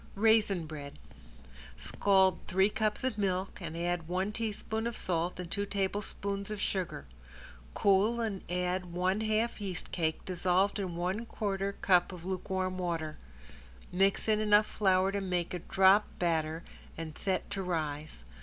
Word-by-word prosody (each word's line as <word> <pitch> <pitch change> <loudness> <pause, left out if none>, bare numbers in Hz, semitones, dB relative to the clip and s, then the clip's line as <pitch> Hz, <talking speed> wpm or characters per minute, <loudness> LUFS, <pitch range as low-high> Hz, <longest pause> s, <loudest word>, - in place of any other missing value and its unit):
~RAISIN 210 -4 +3
BREAD~ 145 -2 -8 0.8
Scald 190 -2 +3
three 190 +3 +3
cups 215 +1 -1
of 255 -5 -1
milk 190 -1 -1
and 165 -1 -5
add 175 -1 -1
one 185 +4 -1
teaspoon 220 0 -3
of 235 - -4
salt 175 0 -1
and 175 -2 -6
two 200 - 0
tablespoons 200 0 -2
of 210 -1 -4
sugar. 180 - -2 0.7
Cool 205 +4 +3
and 215 -5 -2
add 180 0 -1
one 185 +4 +1
half 220 +1 0
yeast 190 -3 -4
cake, 160 -2 -1
dissolved 185 +3 +1
in 185 -4 -3
one 185 +7 -2
quarter 200 -2 -2
cup 180 -2 +4
of 180 -2 -9
lukewarm 185 0 -2
water. 165 -3 -2 0.7
Mix 195 +4 +2
in 215 -1 +3
enough 210 0 +5
flour 190 -2 +2
to 200 0 -1
make 180 -2 -1
a 180 - -2
drop 195 +4 +5
batter 160 -1 0 0.3
and 160 -1 -6
set 190 -2 -1
to 200 -1 -2
rise. 155 - -3
190 Hz, 150 wpm, -31 LUFS, 175-205 Hz, 0.8 s, enough